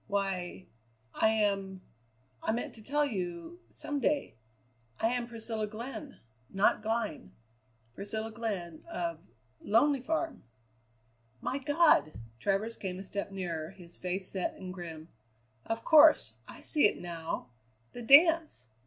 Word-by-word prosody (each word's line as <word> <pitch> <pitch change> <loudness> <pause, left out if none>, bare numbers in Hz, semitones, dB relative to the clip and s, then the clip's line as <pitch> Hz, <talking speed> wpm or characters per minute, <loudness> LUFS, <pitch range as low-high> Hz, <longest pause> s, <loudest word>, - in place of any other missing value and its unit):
"Why 195 -3 -2 0.5
I - - +3
am 195 -3 0 0.6
I - - 0
meant 235 - -3
to 225 - -11
tell 295 +5 +1
you 190 - -5
some 290 -1 -3
day. 290 +2 0 0.7
I 225 - +2
am 245 -1 -1
Priscilla 225 -2 -4
Glenn 250 +7 -8 0.3
not 195 +2 +2
Glynn 215 - -3 0.6
Priscilla 220 - -4
Glenn 200 -8 -4
of 335 0 -3 0.4
Lonely 275 +1 +3
Farm." 320 +4 -2 1.0
"My 265 - -2
God!" 290 - +4 0.3
Travers 200 - -1
came 185 -2 -4
a 190 - -7
step 200 +1 -4
nearer, 170 -5 -4
his 175 -3 -12
face 185 +1 -4
set 190 -2 -3
and 185 -1 -7
grim. 165 -3 -8 0.6
"Of 225 0 -3
course! 310 0 +7
I - - -11
see 295 -8 +6
it - - -4
now 165 -7 -5 0.4
the 245 - -7
dance! 310 - +5
215 Hz, 130 wpm, -31 LUFS, 185-260 Hz, 1.0 s, course